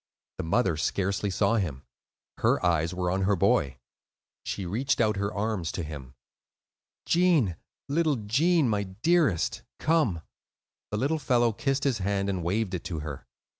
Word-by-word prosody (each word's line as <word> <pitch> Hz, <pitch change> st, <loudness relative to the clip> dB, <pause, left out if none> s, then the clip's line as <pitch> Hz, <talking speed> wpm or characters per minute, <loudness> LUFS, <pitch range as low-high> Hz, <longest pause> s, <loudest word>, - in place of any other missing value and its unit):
The -, -, -1 dB
mother 85 Hz, 0 st, +1 dB
scarcely 100 Hz, +5 st, -1 dB
saw 100 Hz, +4 st, +2 dB
him; 80 Hz, -10 st, -2 dB, 0.6 s
her -, -, +2 dB
eyes 85 Hz, -2 st, +2 dB
were 90 Hz, -1 st, -1 dB
on 95 Hz, +1 st, 0 dB
her 100 Hz, +1 st, +2 dB
boy. 70 Hz, -6 st, +2 dB, 0.7 s
She 100 Hz, -, -4 dB
reached 125 Hz, +10 st, 0 dB
out 105 Hz, -3 st, +2 dB
her 100 Hz, +1 st, -1 dB
arms 100 Hz, -5 st, -2 dB
to 85 Hz, -, -3 dB
him. 70 Hz, -4 st, -8 dB, 0.9 s
"Gene, 165 Hz, -, +3 dB, 0.3 s
little 155 Hz, +1 st, +2 dB
Gene, 140 Hz, +9 st, +2 dB
my 105 Hz, -3 st, +1 dB
dearest, 110 Hz, -, +1 dB, 0.2 s
come." 140 Hz, -, +1 dB, 0.7 s
The 105 Hz, -, -2 dB
little 145 Hz, +7 st, 0 dB
fellow 120 Hz, -4 st, +2 dB
kissed 135 Hz, +4 st, -1 dB
his 135 Hz, -6 st, +1 dB
hand 100 Hz, +1 st, 0 dB
and 90 Hz, -3 st, -3 dB
waved 100 Hz, +3 st, -1 dB
it 90 Hz, -, -3 dB
to 80 Hz, -4 st, -4 dB
her. 75 Hz, -3 st, -7 dB
100 Hz, 155 wpm, -27 LUFS, 90-130 Hz, 0.9 s, Gene